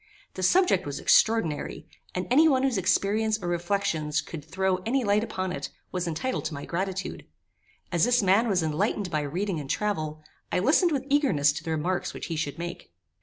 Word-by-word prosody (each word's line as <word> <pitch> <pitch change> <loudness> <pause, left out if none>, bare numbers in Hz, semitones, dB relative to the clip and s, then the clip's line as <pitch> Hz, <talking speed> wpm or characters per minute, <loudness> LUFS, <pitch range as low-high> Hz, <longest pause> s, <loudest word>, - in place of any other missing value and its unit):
The 185 - -6
subject 270 - +3
was 145 - -4
extraordinary; 220 -10 +2 0.3
and 180 0 -1
any 310 +5 +6
one 265 -3 +3
whose 260 -7 +1
experience 210 +4 +1
or 175 - -5
reflections 175 -3 0
could 155 -3 -7
throw 185 +4 0
any 235 +8 -1
light 205 0 +2
upon 185 -5 -3
it, - - -4 0.2
was 180 -1 -2
entitled 210 +11 -2
to 155 - -3
my 140 - -6
gratitude. 190 +2 -3 0.7
As 175 +2 +3
this 245 -2 +3
man 200 +5 +4
was 185 -6 +1
enlightened 180 +4 -1
by 155 - 0
reading 175 +5 -2
and 140 -2 -7
travel, 155 -7 -2 0.3
I - - +1
listened 310 - +3
with 275 -3 -1
eagerness 260 - +3
to 145 - -6
the - - -5
remarks 165 +4 -1
which - - -5
he - - -2
should 150 -2 -3
make. 175 +1 -6
185 Hz, 190 wpm, -27 LUFS, 160-220 Hz, 0.7 s, any